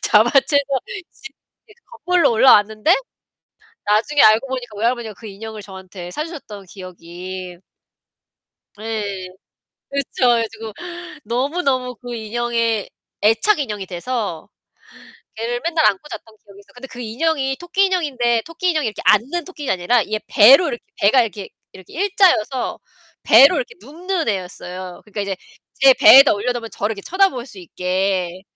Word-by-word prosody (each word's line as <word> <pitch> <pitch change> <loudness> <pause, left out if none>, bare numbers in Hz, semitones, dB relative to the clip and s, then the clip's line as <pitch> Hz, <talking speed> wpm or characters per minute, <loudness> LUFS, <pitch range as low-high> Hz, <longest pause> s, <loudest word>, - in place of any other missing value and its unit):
잡아채서 275 +6 +3 0.5
집 435 - -13 0.3
예 - - -17
그 470 - -35
거꾸로 360 - +1
올라왔는데 220 - +4 0.9
나중에 225 +8 +2
알고 220 +5 +5
보니까 245 -5 -6
외할머니가 235 -1 -1
그 225 - -11
인형을 215 +2 -9
저한테 190 -2 -10
사 300 - -3
주셨던 220 - -10
기억이. 180 0 -9 1.2
네. 205 -4 -5 0.6
그쵸. 275 -2 -1
그래 235 -1 +3
가지고 225 -1 -8 0.5
너무너무 255 +1 -1
그 245 -1 -8
인형에 230 -1 -2 0.3
애착 225 - +3
인형이 210 -8 -4
돼서 195 -1 -5 0.9
걔를 235 +2 -3
맨날 335 -1 +1
안고 200 +10 +1
잤던 220 -1 -10
기억이 200 -1 -17
있어. 200 - -20
근데 255 +2 -11
그 245 - -12
인형이 270 +3 -1
토끼 350 +3 +1
인형인데 260 -11 0
토끼 340 +2 -3
인형이 310 -7 0
이렇게 215 - -6
앉는 275 - +2
토끼가 300 - -4
아니라 200 +7 +1
이게 215 +1 -3
배로 270 - +6
이렇게 240 - -5 0.2
배가 230 +6 +5
이렇게 205 -3 -5 0.2
이렇게 190 -2 -15
일자여서 360 - +1 0.4
배로 - - +7
이렇게 485 -2 -4
눕는 340 +2 -4
애였어요. 185 -2 -5
그러니까 210 0 -5
이제 195 -1 -3 0.4
제 270 -1 +7
배에다 270 +1 +8
올려놓으면 230 +2 -3
저를 205 +2 -3
이렇게 200 - -9
쳐다볼 370 - 0
수 210 - -13
있게. 180 +1 -2
230 Hz, 340 characters per minute, -19 LUFS, 205-280 Hz, 1.2 s, 배에다